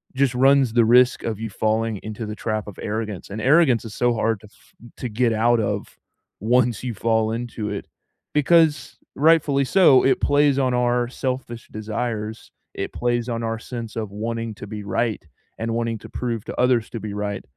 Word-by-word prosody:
just 135 -1 +2
runs 135 -1 +4
the 120 -1 +5
risk 125 +2 +5
of 110 -3 -3
you 110 -1 -5
falling 110 +2 0
into 110 +1 -6
the 105 0 -5
trap 110 -1 -3
of 100 - -9
arrogance, 105 -2 -4
and 100 +2 -5
arrogance 130 -1 +4
is 110 - -8
so 120 -1 +2
hard 115 -1 0
to 105 - -14
f 105 - -26 0.2
to 125 - -4
get 115 +2 +1
out 115 +2 +3
of 100 - -3 0.4
once 120 +1 +2
you 125 -2 -3
fall 110 +1 +1
into 115 -2 -4
it, 100 -1 -5 0.5
because, 155 +1 +3 0.2
rightfully 150 -2 +3
so, 145 -5 +5
it 135 - +3
plays 145 -1 +3
on 130 -2 +1
our 120 0 +1
selfish 125 -2 -5
desires. 110 0 -4 0.2
It - - -4
plays 120 0 -1
on 115 -1 -2
our 115 0 -2
sense 115 -2 -7
of 110 -3 -3
wanting 115 +2 -4
to 105 - -9
be 105 0 -6
right 110 +3 -1 0.4
and 115 0 -2
wanting 115 -1 -1
to - - -12
prove 115 -4 -4
to - - -7
others 125 -2 +2
to 115 - -5
be 105 -1 -5
right 105 -1 -3
115 Hz, 190 wpm, -22 LUFS, 110-125 Hz, 0.5 s, the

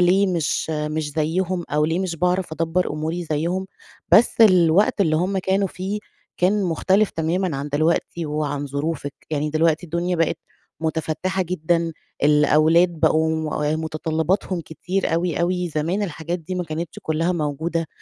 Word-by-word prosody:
ليه 185 +3 +4
مش 170 -3 -1
مش 150 0 -2
زيّهم 175 +3 -1
أو 150 +1 +2
ليه 165 +3 0
مش 185 -3 -2
باعرف 180 0 0
أدبّر 165 +3 0
أموري 160 +3 -3
زيّهم، 170 +5 -1 0.5
بس 230 +1 +5
الوقت 185 0 +5
اللي 155 -5 +3
هم 190 +3 0
كانوا 190 +1 +1
فيه، 195 +3 -4 0.4
كان 195 +3 +2
مختلف 190 +4 +2
تمامًا 165 0 -1
عن 140 +2 -4
دلوقتي 160 +2 0
وعن 145 -1 -2
ظروفِك. 145 0 -3 0.2
يعني 150 0 -1
دلوقتي 160 +2 +2
الدنيا 170 +2 -1
بقت 165 -1 +1 0.4
مُتفتِّحة 160 +4 -1
جدًا، 170 -1 0 0.3
الأولاد 155 +4 +5
بقوا 160 0 +2 0.2
آآ 155 - +1
مُتطلِّباتهم 160 +3 -1
كتير 175 +3 -2
أوي، 170 -1 0
أوي 180 0 0
زمان 165 +7 -1
الحاجات 170 -1 -3
دي 180 +3 -6
ما 180 - -2
كانتش 160 +1 -5
كُلّها 165 +3 0
موجودة، 160 +1 -2
165 Hz, 145 wpm, -22 LUFS, 155-180 Hz, 0.5 s, بس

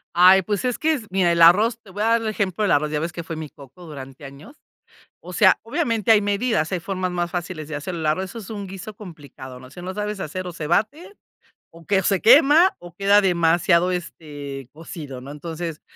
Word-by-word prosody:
Ay, 185 +2 +7
pues 205 +3 -3
es 250 - -1
que 320 +1 +1
es 255 -8 -4
mira, 185 -2 +2
el 170 - 0
arroz 210 +8 +5
te 205 - -16
voy 205 +3 -4
a - - +1
dar 230 +1 +3
el 225 - -3
ejemplo 200 -2 -2
del 205 - +1
arroz, 150 +1 +1
ya 150 -1 -2
ves 165 +1 -3
que 170 - -6
fue 165 - -6
mi 155 -1 -6
coco 145 +7 -15
durante 135 -2 -10
años. 140 - -13 0.6
O - - -11
sea, - - +4
obviamente 230 - 0
hay 210 - +6
medidas, 205 -3 0
hay 185 - -1
formas 185 0 -3
más 175 -1 -2
fáciles 175 -3 -5
de 150 - -6
hacer 165 +5 -5
el 160 -2 -4
arroz, 155 +5 0
eso - - -10
es 210 - -11
un 205 -2 -6
guiso 195 +3 -9
complicado, 145 - -11
¿no?, 130 0 -13
si 175 - -11
no 185 +1 -6
sabes 210 0 -4
hacer, 185 +3 -5
o 180 - -7
se 155 -2 -6
bate 275 - -1 0.5
o 165 -1 -17
que 195 -1 +2
se 195 0 0
quema 300 +8 +6
o 175 0 -13
queda 200 +1 +4
demasiado 175 -1 +2
este, 145 -6 -7
cocido, 150 -4 -9
¿no? 135 +3 -10
Entonces 165 +1 -6
180 Hz, 230 wpm, -22 LUFS, 155-205 Hz, 0.6 s, Ay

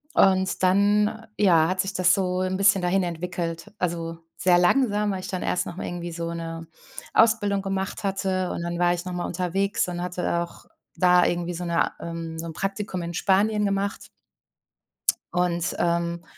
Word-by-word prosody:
Und 190 - +3
dann, 205 +4 +3
ja, 170 -6 +5
hat 185 +1 -2
sich 195 0 -4
das 185 -1 +4
so 185 -1 0
'n 185 0 -1
bisschen 195 -2 +4
dahin 190 +2 +2
entwickelt. 170 -1 -4
Also, 165 -2 -2 0.2
sehr 180 -1 +4
langsam, 210 +1 +2
weil 185 -1 -3
ich - - -7
dann 185 -2 -3
erst 180 - 0
nochmal 175 - -6
irgendwie 175 -1 -5
so 170 0 -4
'ne 165 -1 -6 0.5
Ausbildung 205 -3 +3
gemacht 195 +2 -3
hatte. 190 -2 -1
Und - - -4
dann 170 0 -3
war 175 0 +3
ich 175 +1 -5
nochmal 180 -1 -3
unterwegs 185 +3 -1
und 175 0 -4
hatte 180 -1 -1
auch 170 0 -8 0.3
da 180 +1 +5
irgendwie 175 0 -1
so 175 +1 -4
'ne 170 0 +1
ähm, 165 -1 -6
so 165 - -5
'n 165 - -6
Praktikum 195 0 -3
in 170 0 -5
Spanien 210 +3 +2
gemacht. 200 0 -2 1.3
Und, 175 -1 0
ähm, 170 0 0
180 Hz, 170 wpm, -25 LUFS, 170-195 Hz, 1.3 s, ja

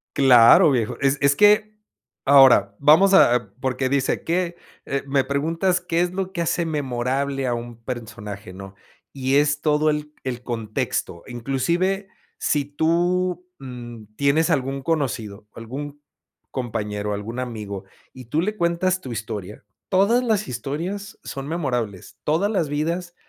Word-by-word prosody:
Claro 130 +1 +7
viejo, 115 -4 -1
es 135 0 +2
es 140 0 +3
que 210 +2 +4 0.5
ahora, 135 -8 +6
vamos 160 +7 +6
a 120 - +4
porque 130 0 -1
dice 140 -1 0
que, 175 0 -1 0.3
eh, 140 0 -2
me 135 -1 +1
preguntas, 165 +7 0
¿qué 170 -1 -1
es 180 0 0
lo 190 0 -3
que 170 - -3
hace 170 +1 0
memorable 135 -1 -2
a 120 - 0
un 120 0 -6
personaje, 110 -5 -7
no? 95 0 -10 0.4
y 135 0 -1
es 145 +1 +3
todo 150 0 +2
el 150 0 -3
el 125 -2 -4
contexto, 110 -7 -3
inclusive 170 - -1 0.3
si 145 -1 +1
tú, 175 +5 0
mm, 120 -4 -9
tienes 145 +4 +2
algún 135 -2 -1
conocido, 115 -10 -2
algún 140 +6 -7 0.5
compañero, 105 -4 -3
algún 110 +5 -5
amigo, 105 -6 -5 0.3
y 130 -1 -11
tú 150 +8 -1
le 210 +5 -1
cuentas 180 +1 0
tu 130 - -7
historia, 105 -2 -6 0.2
todas 200 +6 +3
las 215 -4 0
historias 165 - -5
son 135 0 -6
memorables, 125 - -3
todas 165 +7 +1
las 180 -9 0
vidas 170 +4 -2
140 Hz, 140 wpm, -22 LUFS, 120-170 Hz, 0.5 s, Claro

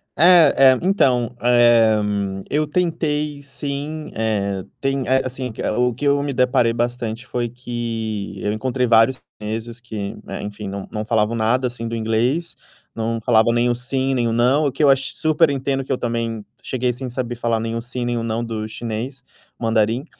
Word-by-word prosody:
É, 155 -6 +7
é, - - -4
então, 125 - +2
eh, 120 -2 +5 0.5
eu 150 +1 0
tentei 150 -3 -1
sim, 140 +2 -5
eh, 100 -3 -1 0.2
tem 135 -1 -1
eh, 130 +1 +3
assim, 130 -1 -3
que - - -15
o 125 +3 +1
o - - -4
que 140 - -4
eu 140 0 +3
me 145 0 -2
deparei 125 -2 +3
bastante 120 0 -3
foi 120 -1 -2
que 115 -4 -4
eu 105 - -1
encontrei 125 +3 -1
vários 115 +2 +4 0.2
chineses 110 +3 -5
que, 110 -4 -6
né, - - -6
enfim, 105 0 -6
não 100 0 -6
não 105 -1 -3
falavam 110 0 +1
nada, 115 +3 +1
assim, 120 -2 -3
do 115 - -3
inglês, 115 +9 0 0.4
não 115 0 -2
falavam 115 -1 +4
nem 120 +1 +2
o - - +2
"sim.", 130 +2 0
nem 120 -2 +1
o - - 0
"não". 130 +6 +3
O - - -1
que 135 +4 -1
eu 145 - +6
acho 135 0 0
super 155 0 +3
entendo 135 -1 -1
por 135 - -5
que - - -4
eu - - -1
também 115 -3 -3 0.2
cheguei 125 -1 -1
sem 125 +1 -5
saber 120 0 -3
falar 115 -1 0
nem 115 +1 -3
o 115 - -2
"sim.", 125 +1 -4
nem 120 0 -1
o 115 - -1
"não." 115 +1 -2
do 110 -2 -4
chinês, 120 +4 -5 0.4
mandarim. 115 +3 +1
120 Hz, 195 wpm, -21 LUFS, 115-135 Hz, 0.5 s, É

